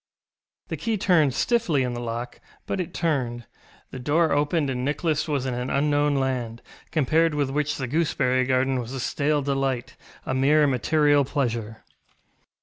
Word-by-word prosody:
The - - -3
key 225 -2 -1
turned 160 -9 +3
stiffly 200 - +1
in 125 -1 -2
the 120 - -4
lock, 120 +1 -5 0.2
but 195 - -2
it 175 -1 -6
turned. 130 -9 -1 0.5
The 130 - -7
door 155 +5 +2
opened, 145 +1 +1
and 125 -1 -3
Nicholas 155 +2 -1
was 140 -4 -1
in 130 - -2
an 125 +1 -3
unknown 145 0 +2
land, 125 -4 -2 0.3
compared 160 +1 +2
with 140 -2 0
which 150 +1 -1
the 130 - -3
gooseberry 130 -3 +1
garden 130 0 +1
was 120 +1 -6
a 135 - -4
stale 145 +3 0
delight, 135 -3 -2 0.3
a - - -2
mere 145 +3 +4
material 145 +2 +3
pleasure. 115 -5 -3
140 Hz, 160 wpm, -24 LUFS, 125-150 Hz, 0.5 s, mere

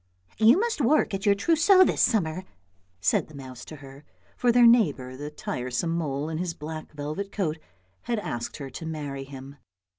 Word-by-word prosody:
" 90 - -37
You 225 - +6
must 455 -6 -1
work 280 -1 +3
at 195 +2 -2
your 200 - +5
trousseau 335 - +5
this - - +1
summer," 185 -6 +1 0.6
said - - +2
the 155 - -14
mouse 130 -3 -9
to 155 - -9
her, 140 0 -13 0.3
for 245 - +2
their 245 0 +6
neighbour 150 - +3
the 145 +3 -6
tiresome 130 +1 -3
mole 150 -3 -2
in 160 0 -4
his 175 -2 -3
black 155 +1 -7
velvet 150 +7 -5
coat 165 -7 -2 0.5
had 235 - -1
asked 120 - -4
her 135 -3 -7
to 160 - -7
marry 145 -4 -5
him. 135 +1 -10
160 Hz, 185 wpm, -26 LUFS, 140-215 Hz, 0.6 s, You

